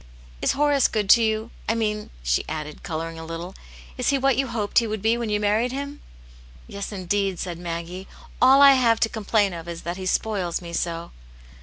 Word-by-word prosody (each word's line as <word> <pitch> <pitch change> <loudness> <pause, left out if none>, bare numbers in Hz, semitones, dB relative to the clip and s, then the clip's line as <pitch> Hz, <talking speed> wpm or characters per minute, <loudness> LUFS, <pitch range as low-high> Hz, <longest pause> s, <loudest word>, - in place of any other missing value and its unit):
" - - -22
Is - - +2
Horace 285 -1 +3
good 210 -3 -1
to 235 - +7
you? 220 +1 0 0.2
I 225 - +2
mean," 210 -2 -2
she - - +1
added, 150 -1 -5
colouring 165 -1 -5
a - - -7
little, 165 +3 -6 0.2
" - - -19
is 250 - +1
he 280 - +3
what 270 -1 +2
you 270 +2 0
hoped 225 -3 +1
he 230 - -2
would 215 -2 -4
be 225 +1 +3
when 235 -2 -3
you 210 0 +1
married 215 +4 +1
him 280 +2 -5 0.3
?" - - -22 0.3
"Yes, 200 +1 -6
indeed!" 195 0 -1
said 175 -2 -5
Maggie; 175 +2 -5 0.3
"all 270 +2 +7
I 280 - +10
have 235 -4 +3
to 225 - +3
com 220 -2 -7
plain 205 -3 +2
of 165 -1 -8
is 170 -1 -7
that 175 +1 -4
he 185 -1 -5
spoils 185 -4 -1
me 170 -1 -9
so." 170 0 -3
205 Hz, 225 wpm, -24 LUFS, 170-230 Hz, 0.3 s, I